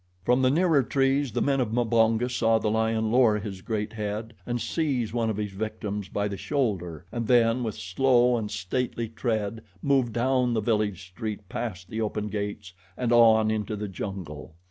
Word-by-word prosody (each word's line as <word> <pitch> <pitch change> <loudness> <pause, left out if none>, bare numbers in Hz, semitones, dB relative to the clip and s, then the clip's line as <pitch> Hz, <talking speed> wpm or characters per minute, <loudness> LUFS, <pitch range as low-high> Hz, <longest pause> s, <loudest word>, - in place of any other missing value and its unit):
From 125 +2 +3
the 130 - +4
nearer 160 0 +3
trees 135 +1 +1
the - - 0
men 140 -1 +1
of 115 -3 -1
Mbonga 115 0 +2
saw 115 -2 +2
the 110 -1 0
lion 110 0 +1
lower 120 -3 +4
his 100 -3 -6
great 110 +1 -3
head 110 +1 -4
and 120 0 -1
seize 120 -2 -1
one 115 -2 0
of 110 - -2
his 105 -1 -3
victims 105 0 -4
by 100 0 -1
the 100 -1 -5
shoulder 95 - -2
and 115 -2 -3
then 120 0 +4
with 110 -3 -3
slow 125 +6 +3
and 110 -3 -2
stately 115 +5 -2
tread 110 -1 -2 0.2
move 135 -4 +2
down 125 +1 +1
the - - +2
village 105 -4 0
street 105 +1 -6
past 95 -6 -5
the 110 0 -2
open 105 -1 -2
gates 100 -2 -4 0.2
and 125 -2 -1
on 110 -2 +6
into 110 0 -2
the 105 0 -4
jungle. 90 -5 -7
110 Hz, 185 wpm, -26 LUFS, 105-120 Hz, 0.2 s, on